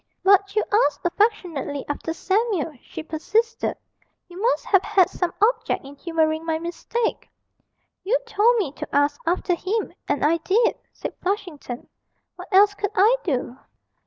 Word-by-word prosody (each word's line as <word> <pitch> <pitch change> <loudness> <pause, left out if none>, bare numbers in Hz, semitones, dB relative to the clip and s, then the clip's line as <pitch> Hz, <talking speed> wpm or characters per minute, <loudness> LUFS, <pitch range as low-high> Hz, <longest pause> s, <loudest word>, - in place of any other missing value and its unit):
'But 395 +1 +4
you 430 - +3 0.2
asked 295 - -7
affectionately 345 - 0
after 290 +3 -3
Samuel,' 380 -2 0
she - - -8
persisted; 435 +9 -1 0.5
'you 360 +2 -10
must 480 +3 +1
have 385 -2 +4
had 390 -4 +3
some 360 -2 -1
object 430 - +1
in 275 - -10
humouring 315 0 0
my 325 -1 -1
mistake.' 345 +8 -3 0.7
'You 455 +6 +2
told 465 +1 +3
me 370 -11 0
to 275 - -7
ask 285 0 +2
after 355 +1 +1
him, 390 +6 -2
and 290 - +1
I 325 +3 +3
did,' 430 +8 +1
said - - -6
Flushington; 355 - -4 0.5
'what - - -10
else 405 +1 +6
could 405 0 -2
I 425 +5 +5
do?' 255 -5 -2
370 Hz, 150 wpm, -23 LUFS, 315-420 Hz, 0.7 s, else